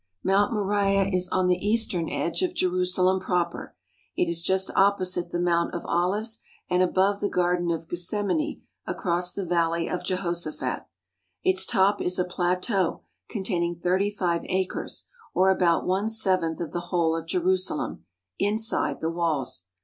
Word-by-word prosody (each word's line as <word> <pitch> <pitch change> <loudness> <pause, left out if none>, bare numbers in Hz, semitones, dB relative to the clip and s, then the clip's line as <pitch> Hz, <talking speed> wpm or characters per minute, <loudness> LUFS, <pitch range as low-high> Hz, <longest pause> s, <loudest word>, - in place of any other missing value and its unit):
" - - -50
Mount 200 +5 +3
Moriah 200 -2 +2
is 180 0 0
on 185 0 +1
the 180 0 +1
eastern 205 -6 +1
edge 170 - -1
of 365 -1 -1
Jerusalem 185 - +2
proper. 180 -2 -2 0.4
It - - +1
is 170 0 -1
just 190 +2 +1
opposite 185 -3 +2
the 175 - -2
Mount 170 -1 +1
of 170 - -5
Olives 205 +6 0 0.3
and 180 0 +3
above 190 +2 +2
the 205 - -1
Garden 175 -1 +1
of 165 -1 -2
Gethsemane 205 - -2 0.2
across 180 0 0
the 195 0 -4
Valley 170 -1 +1
of 180 - -3
Jehoshaphat. 175 -4 -2 0.6
Its 190 0 +3
top 200 +2 +3
is 180 +1 0
a 180 - +1
plateau 180 +1 0 0.3
containing 180 -5 -1
thirty 185 +4 +1
five 180 -4 -1
acres, 185 0 -3 0.3
or 190 +1 +5
about 175 -3 +2
one 195 +4 +1
seventh 185 -7 +1
of 165 -3 -4
the 175 - -2
whole 170 -3 +2
of 165 0 -5
Jerusalem, 180 - 0 0.4
inside 220 +10 +1
the 160 - 0
walls. 150 - -2
180 Hz, 155 wpm, -26 LUFS, 170-195 Hz, 0.6 s, or